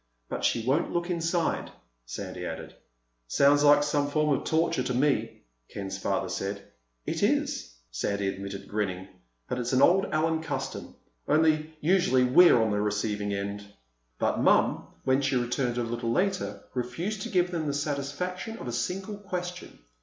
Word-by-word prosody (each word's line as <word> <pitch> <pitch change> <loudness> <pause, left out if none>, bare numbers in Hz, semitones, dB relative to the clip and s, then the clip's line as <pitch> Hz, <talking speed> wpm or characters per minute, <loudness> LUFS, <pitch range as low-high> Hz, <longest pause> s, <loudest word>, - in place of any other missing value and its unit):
"But - - -4
she 115 -1 +1
won't 140 +7 +1
look 175 +1 -1
inside," 170 0 0 0.4
Sandy - - -6
added. - - -6 0.5
"Sounds 140 - +4
like 145 0 +6
some 145 -1 0
form 150 -1 +2
of - - -5
torture 160 -4 +1
to 125 -1 -2
me," 140 +2 0 0.3
Ken's 95 -1 -5
father - - -1
said. 100 0 -4 0.4
"It - - -2
is," - - 0 0.2
Sandy 100 -1 -1
admitted, 100 0 -6
grinning. 95 -3 -2 0.4
"But 125 - -2
it's 125 +1 -2
an 130 - +4
old 195 +3 +5
Allen 160 +1 +1
custom—only 155 - -1
usually 155 -7 +3
we're 130 +2 +7
on 110 -1 +2
the 105 0 +1
receiving 105 0 -1
end." 100 +1 -3 0.5
But - - 0
Mom, - - +3 0.2
when 130 +1 +2
she 135 -1 +1
returned 125 0 0
a 120 - +1
little 115 0 -2
later, 180 - -1
refused 165 - -3
to - - -4
give 180 -2 +2
them 165 -3 -2
the 145 - 0
satisfaction 150 +9 -3
of - - -7
a - - -2
single 190 - -3
question. 180 -2 -6
140 Hz, 160 wpm, -28 LUFS, 110-165 Hz, 0.5 s, we're